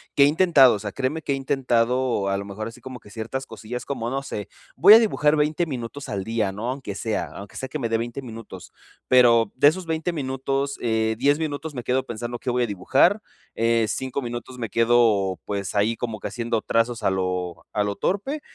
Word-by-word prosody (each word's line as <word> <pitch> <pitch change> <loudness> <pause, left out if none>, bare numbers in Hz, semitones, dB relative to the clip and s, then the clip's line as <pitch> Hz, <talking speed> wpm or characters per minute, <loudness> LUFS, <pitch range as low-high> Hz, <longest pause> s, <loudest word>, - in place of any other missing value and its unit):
que 140 - +6
he - - +7
intentado, 150 -7 +5
o - - -5
sea, 105 -1 -5
créeme 135 +4 -2
que - - -2
he - - 0
intentado 125 -5 0
a 100 - 0
lo 100 - -5
mejor 105 +2 -6
así 115 +1 -11
como 130 -2 -8
que 105 - -17
ciertas 120 +5 -5
cosillas 120 +2 -7
como 120 -4 -3
no 135 +1 -1
sé, 105 -6 -5 0.3
voy 210 - +8
a - - +9
dibujar 155 -9 +2
20 155 +3 +1
minutos 130 +1 -6
al 100 -2 -3
día, 110 -3 -1
¿no? 110 +5 -4
Aunque 130 -6 -4
sea 110 +1 -2
aunque 100 0 -10
sea 130 - -4
que 155 - -4
me 115 -3 -2
de 115 - +2
20 120 +3 -4
minutos. 110 -6 -10 0.4
Pero, 120 -3 +5
de 145 +3 +6
esos 180 +1 -5
20 160 +2 -1
minutos, 135 -1 -2
eh, 110 -1 +1
10 145 +3 +3
minutos, 155 0 -4
me 120 - -4
quedo 130 +2 0
pensando 120 +1 -5
qué 125 - -2
voy 125 0 0
a - - 0
dibujar, 135 - +2 0.3
eh, 115 -1 +2
5 130 +4 -3
minutos, 120 +1 -6
me 115 -3 -3
quedo 115 -5 +3
pues, 100 -2 -3
ahí 110 +3 +2
como 115 -4 -4
que - - -4
haciendo 115 -2 -2
trazos 115 0 0
a - - +3
lo 90 -2 -3
a 105 - +1
lo 100 -1 -2
torpe 270 +11 -2
120 Hz, 220 wpm, -24 LUFS, 110-140 Hz, 0.4 s, a